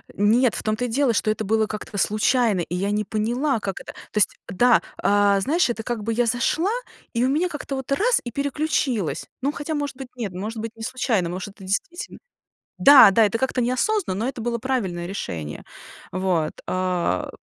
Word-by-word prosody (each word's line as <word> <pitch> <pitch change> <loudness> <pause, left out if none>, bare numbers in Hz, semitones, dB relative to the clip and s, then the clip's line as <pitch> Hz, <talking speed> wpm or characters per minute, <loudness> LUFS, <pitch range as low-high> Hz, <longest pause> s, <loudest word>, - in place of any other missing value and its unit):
Нет 225 +4 +3
в - - -5
том 215 0 0
то 245 +3 -2
и - - -1
дело, 255 +1 +2
что 215 0 +1
это 215 - -3
было 220 +1 +2
как-то 210 -1 -6
в - - +2
случайно, 215 -1 +2
и 170 +1 -4
я 195 +3 -1
не 210 0 0
поняла, 240 +6 0
как 195 -3 -4
это. - - -9 0.2
То - - -6
есть, 210 - +3
да, 240 +6 +4 0.2
а, 205 -1 +3
знаешь, 310 - +2
это 225 -2 -3
как 230 -2 -3
бы 225 +2 -1
я 240 +2 +2
зашла 250 - +1 0.4
и 235 0 +1
у - - +2
меня 320 +6 +1
как-то 295 -3 -5
вот 265 0 -6
раз 450 - +3
и 240 - -6
переключилось. 280 - -1 0.2
Ну, 275 +2 +1
хотя 295 +2 -4
может 290 -2 -3
быть 265 -1 -7
нет 220 -7 -4
может 215 +5 -5
быть 225 0 -4
не 225 - -9
случайно 230 -7 0
может 185 +3 -5
это 195 - -14
действительно 200 - -3 0.6
Да-да, 230 -6 +8
это 210 +2 0
как-то 260 0 0
неосознанно, 255 - 0
но - - 0
это 250 -3 -6
было 235 +1 -1
правильное 220 -9 -2
решение. 80 - -5 0.5
Вот, 180 -4 0
а 180 - -1
225 Hz, 205 wpm, -23 LUFS, 200-265 Hz, 0.6 s, Да-да